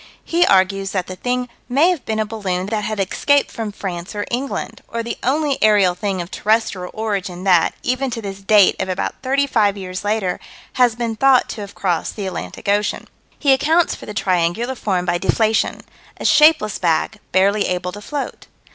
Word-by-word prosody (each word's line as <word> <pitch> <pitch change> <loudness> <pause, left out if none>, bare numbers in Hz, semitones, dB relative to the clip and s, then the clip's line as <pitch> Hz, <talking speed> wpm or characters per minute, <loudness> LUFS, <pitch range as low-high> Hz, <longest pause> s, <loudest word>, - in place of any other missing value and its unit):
He 345 +1 +2
argues 195 0 +2
that 185 -3 -1
the 185 - -7
thing 250 +4 -2 0.2
may 295 +8 +4
have 345 -7 -3
been 220 - -2
a 215 - +1
balloon 195 -4 -3
that 210 +1 -2
had 215 -1 -3
escaped 280 +9 +1
from 220 -2 -4
France 180 -2 -6
or 205 - -2
England 260 +3 -3
or 230 0 -4
the 235 0 -5
only 285 +2 0
aerial 205 -4 +4
thing 185 0 -2
of 170 - -13
terrestrial 210 -4 0
origin 200 -5 -3
that, 180 -3 +3
even 255 +2 0
to 230 - -4
this 200 -3 -6
date 200 -1 +5
of - - -3
about 185 - -3
thirty 275 +2 +1
five 210 -6 +2
years 185 -1 -6
later, 205 -3 -1 0.3
has 245 -3 +3
been 230 -1 -2
thought 270 +1 +4
to 215 - -6
have 200 -1 -9
crossed 175 -4 -1
the 205 - -4
Atlantic 185 +1 -6
Ocean. 205 +1 0 0.3
He 275 -2 +4
accounts 320 +6 +2
for - - -10
the 210 - -7
triangular 185 +5 0
form 190 -7 -1
by 175 -1 0
deflation 220 +3 +1 0.4
"a - - -7
shapeless 305 -8 +5
bag, 175 +5 0
barely 200 +3 +3
able 180 0 -2
to 205 - -9
float." 285 +6 -5
210 Hz, 190 wpm, -19 LUFS, 190-245 Hz, 0.4 s, date